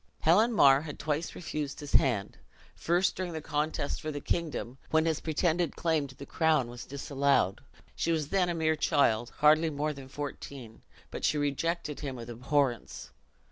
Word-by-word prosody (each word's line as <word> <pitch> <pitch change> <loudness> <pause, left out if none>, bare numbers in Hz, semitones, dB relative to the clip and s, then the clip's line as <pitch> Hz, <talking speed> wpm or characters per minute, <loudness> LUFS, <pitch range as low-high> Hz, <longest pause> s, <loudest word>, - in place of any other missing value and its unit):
Helen 210 +9 +4
Mar 140 -10 +6
had 150 -2 -7
twice 155 +2 -2
refused 150 -4 -4
his 145 -2 -7
hand: 115 -7 +2 0.4
first, 175 +3 +1
during 180 -2 -4
the 160 - -3
contest 150 -1 -2
for 155 - -4
the 145 - -4
kingdom, 145 -5 -3
when 160 0 +3
his 160 -2 +1
pretended 165 +1 0
claim 160 -4 0
to 130 - -14
the 140 - -9
crown 155 -7 +1
was 120 0 -9
disallowed. 140 -6 +1 0.3
She 170 - 0
was 155 -3 -1
then 185 -1 +2
a 170 - -1
mere 160 -1 +1
child, 125 -7 +2
hardly 155 +2 +5
more 150 +1 -2
than 135 -2 -11
fourteen; 140 -4 -7 0.3
but - - -6
she 150 - +2
rejected 150 +2 -1
him 140 -3 -4
with 120 -1 -7
abhorrence. 125 +1 -1
150 Hz, 175 wpm, -30 LUFS, 135-160 Hz, 0.4 s, Mar